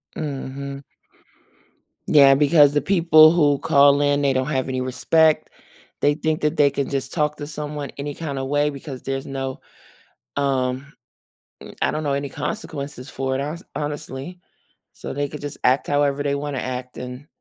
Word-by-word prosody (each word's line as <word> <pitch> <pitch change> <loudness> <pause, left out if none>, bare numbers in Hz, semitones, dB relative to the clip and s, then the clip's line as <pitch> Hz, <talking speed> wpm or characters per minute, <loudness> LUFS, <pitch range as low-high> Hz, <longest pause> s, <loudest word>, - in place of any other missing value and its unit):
Mhm. 140 -1 -5 1.3
Yeah, 140 -2 +7
because 145 0 +5
the 145 - +2
people 165 -2 +6
who 145 -5 +3
call 145 -2 +5
in, 145 0 +2
they 140 -1 +2
don't 130 0 0
have 130 -3 -1
any 130 0 -2
respect. 155 +5 +2 0.5
They 145 - +3
think 155 +1 -1
that 150 +2 0
they 145 -2 +5
can 140 0 -3
just 135 -1 -3
talk 150 -2 0
to 145 - -6
someone 150 -1 -5
any 145 +1 -4
kinda 140 -5 -4
way 145 +2 +1
because 140 -2 -8
there's 135 0 -4
no, 135 -1 -5 0.8
um, 135 0 -1 0.7
m - - -11
I - - +2
don't 155 - -3
know 145 -2 0
any 140 0 -2
consequences 145 - -5
for 130 0 -2
it, 135 - -1
hones 155 +5 -5
honestly, 150 +3 -5 0.5
so - - -7
they 145 +1 -1
could 150 - -9
just 145 -1 -6
act 130 +2 +3
however 145 0 +1
they 140 -1 0
wanna 140 -2 -3
act 125 0 -5
and 125 +3 -8
145 Hz, 170 wpm, -22 LUFS, 135-150 Hz, 1.3 s, Yeah